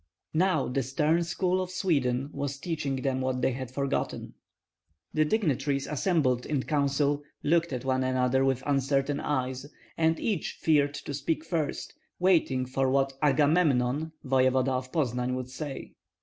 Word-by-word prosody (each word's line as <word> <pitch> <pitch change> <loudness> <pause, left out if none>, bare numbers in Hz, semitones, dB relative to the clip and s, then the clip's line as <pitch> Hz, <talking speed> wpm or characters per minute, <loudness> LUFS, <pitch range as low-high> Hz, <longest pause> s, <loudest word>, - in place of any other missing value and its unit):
Now 160 -3 +2
the 130 +2 0
stern 150 +6 +1
school 185 +2 0
of 185 - -4
Sweden 140 -8 0
was 140 -1 -3
teaching 145 -3 -2
them 130 -1 0
what 130 -1 -1
they - - +3
had 130 0 -5
forgotten. 140 +1 -2 0.8
The 155 0 +3
dignitaries 145 - 0
assembled 145 -6 +1
in 145 -4 -1
council 145 0 +1 0.2
looked 170 +2 +2
at 130 -1 -4
one 130 0 +1
another 130 0 +2
with 135 -1 +1
uncertain 140 0 +1
eyes, 130 -1 -2 0.3
and 160 0 +2
each 205 -7 -2
feared 145 -2 +2
to 145 - -6
speak 155 +3 -2
first, 160 -4 -2 0.2
waiting 165 -8 +2
for 130 +1 0
what 135 0 +2
"Agamemnon," 145 -1 +2
voevoda 130 0 +2
of 130 0 -3
Poznan, 125 -4 0
would 130 0 -5
say. 140 0 -6
140 Hz, 150 wpm, -28 LUFS, 130-155 Hz, 0.8 s, they